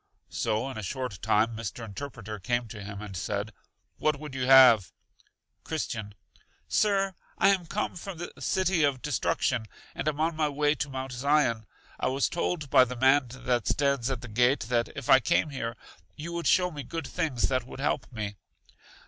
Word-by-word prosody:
So 110 +4 -1
in 115 - -6
a - - -4
short 125 -2 -4
time 110 +1 +2
Mr. 115 +1 -5
Interpreter 110 -1 -7
came 120 +4 -1
to 105 -2 -8
him 100 +1 -7
and 100 -2 -8
said: 100 +3 -3 0.5
What 155 -2 +1
would 150 -2 -8
you 130 -1 -2
have? 125 - +8 0.7
Christian. 110 -10 -4 0.5
Sir, 195 -2 +2 0.2
I 195 - +5
am 185 -4 +1
come 210 +3 -2
from 180 0 -7
The 175 - -6
City 185 -3 +1
of 140 -3 +1
Destruction, 125 -5 0 0.3
and - - -4
am 150 -1 0
on 160 +1 +1
my 155 -1 +1
way 145 +1 +2
to 150 -1 -3
Mount 130 0 -5
Zion. 125 -4 +1 0.3
I - - 0
was 135 +1 +1
told 170 -4 -2
by - - +8
the 125 0 -4
man 130 +2 +4
that 125 -2 -1
stands 140 -3 +1
at 130 -4 -3
the 125 - -8
gate, 125 +5 +2
that 120 0 0
if - - -6
I 130 - +8
came 145 +4 +1
here 115 -4 -4 0.4
you 170 +3 -6
would 170 0 -2
show 180 -1 +4
me 150 -3 -6
good 160 +4 -5
things 145 -5 -1
that 130 -2 -1
would 130 - -9
help 135 -1 -1
me. 105 -4 -5
130 Hz, 190 wpm, -28 LUFS, 115-150 Hz, 0.7 s, have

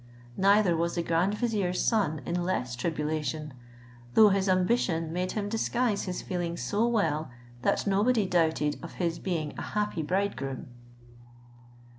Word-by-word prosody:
Neither 200 -2 +4
was 170 +1 -1
the 170 - 0
grand 170 +5 +1
vizier's 210 -6 -1
son 190 -10 +1
in 175 +1 -1
less 150 -9 -1
tribulation, 150 0 -2 0.6
though 215 -1 +8
his 195 0 +1
ambition 180 -4 +1
made 180 +1 -2
him 205 -2 -2
disguise 225 0 0
his 180 -2 -4
feelings 175 -2 -3
so 215 +3 +1
well, 160 - 0 0.3
that - - +1
nobody 210 +3 +2
doubted 160 -5 +1
of 170 - -8
his 170 -2 -2
being 160 -6 -2
a - - -4
happy 210 -5 -2
bridegroom. 150 -7 -2
180 Hz, 140 wpm, -28 LUFS, 160-205 Hz, 0.6 s, though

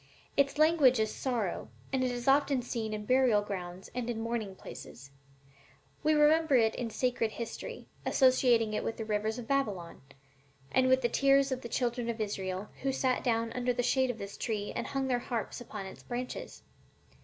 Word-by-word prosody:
Its 280 0 +2
language 305 -6 +5
is 220 -1 0
'sorrow,' 235 -8 -2 0.2
and 260 -1 +2
it 255 - +1
is 245 0 -4
often 275 -2 +3
seen 225 -3 -3
in 210 -1 -4
burial 250 -4 +4
grounds 185 -2 -6
and 245 -1 -3
in 230 -2 -2
mourning 225 -4 -3
pictures. 135 -6 -10 0.9
'We 310 0 +3
remember 300 0 +4
it 225 -3 +4
in 240 -2 -3
sacred 230 -1 0
history, 235 - -6 0.2
associating 245 -4 +4
it - - -1
with 225 - -3
the 225 - -4
rivers 215 +1 -1
of 240 -2 -7
Babylon, 210 -12 -1 0.7
and 260 0 +3
with 260 0 +4
the - - +4
tears 275 +2 +3
of 260 0 -2
the 235 - -7
children 240 -1 -1
of 230 -1 -3
Israel, 195 -2 -3
who 270 - +1
sat 260 -1 0
down 230 -2 0
under 250 0 0
the 245 - -1
shade 260 +1 +2
of 245 - -2
this 200 -2 -7
tree 210 -3 -3
and - - -2
hung 270 -1 -1
their 250 -2 +1
harps 240 0 -4
upon 210 -4 -7
its 190 - -10
branches. 250 +1 -6
240 Hz, 190 wpm, -31 LUFS, 215-260 Hz, 0.9 s, language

